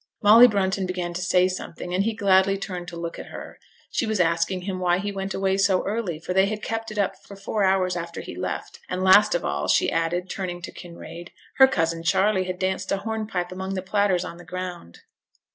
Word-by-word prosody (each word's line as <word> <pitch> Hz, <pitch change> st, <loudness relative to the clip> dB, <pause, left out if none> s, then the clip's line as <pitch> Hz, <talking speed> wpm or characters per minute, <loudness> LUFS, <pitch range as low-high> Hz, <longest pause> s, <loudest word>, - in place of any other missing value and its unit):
Molly 225 Hz, +4 st, +9 dB
Brunton 195 Hz, -3 st, 0 dB
began 180 Hz, -1 st, -3 dB
to 175 Hz, -, -4 dB
say 180 Hz, 0 st, +3 dB
something, 180 Hz, -1 st, -6 dB
and 185 Hz, +2 st, +2 dB
he 225 Hz, +1 st, -1 dB
gladly 195 Hz, -2 st, +3 dB
turned 180 Hz, -3 st, -6 dB
to 175 Hz, -, -7 dB
look 170 Hz, 0 st, -5 dB
at -, -, -8 dB
her. -, -, -10 dB, 0.3 s
She 230 Hz, -, -1 dB
was 215 Hz, -2 st, -1 dB
asking 170 Hz, +2 st, +1 dB
him 185 Hz, 0 st, -4 dB
why 175 Hz, -1 st, +2 dB
he 205 Hz, +2 st, -3 dB
went 195 Hz, -1 st, -4 dB
away 195 Hz, 0 st, +1 dB
so 195 Hz, -2 st, +2 dB
early, 200 Hz, -5 st, -2 dB
for 175 Hz, +3 st, -4 dB
they 190 Hz, +1 st, +4 dB
had 215 Hz, 0 st, -4 dB
kept 225 Hz, 0 st, -3 dB
it 215 Hz, -, -8 dB
up 200 Hz, -2 st, 0 dB
for 200 Hz, -, -12 dB
four 200 Hz, +1 st, -2 dB
hours 190 Hz, -1 st, +2 dB
after 170 Hz, 0 st, -5 dB
he -, -, -8 dB
left, -, -, -5 dB
and 185 Hz, 0 st, -2 dB
last 205 Hz, -, +6 dB
of -, -, -1 dB
all, -, -, -2 dB
she -, -, +3 dB
added 165 Hz, +2 st, -1 dB
(turning 180 Hz, -2 st, -4 dB
to -, -, -6 dB
Kinraid), 170 Hz, 0 st, -10 dB, 0.3 s
her 265 Hz, -, +9 dB
cousin 165 Hz, -8 st, -1 dB
Charley 190 Hz, +3 st, +2 dB
had 185 Hz, 0 st, -4 dB
danced 190 Hz, +1 st, -2 dB
a 195 Hz, -, +2 dB
hornpipe 215 Hz, -4 st, -3 dB
among 190 Hz, +1 st, -4 dB
the 185 Hz, -, -3 dB
platters 190 Hz, -2 st, +1 dB
on 170 Hz, -, -8 dB
the 175 Hz, -, -12 dB
ground. 175 Hz, -, -7 dB
185 Hz, 225 wpm, -24 LUFS, 180-200 Hz, 0.3 s, Molly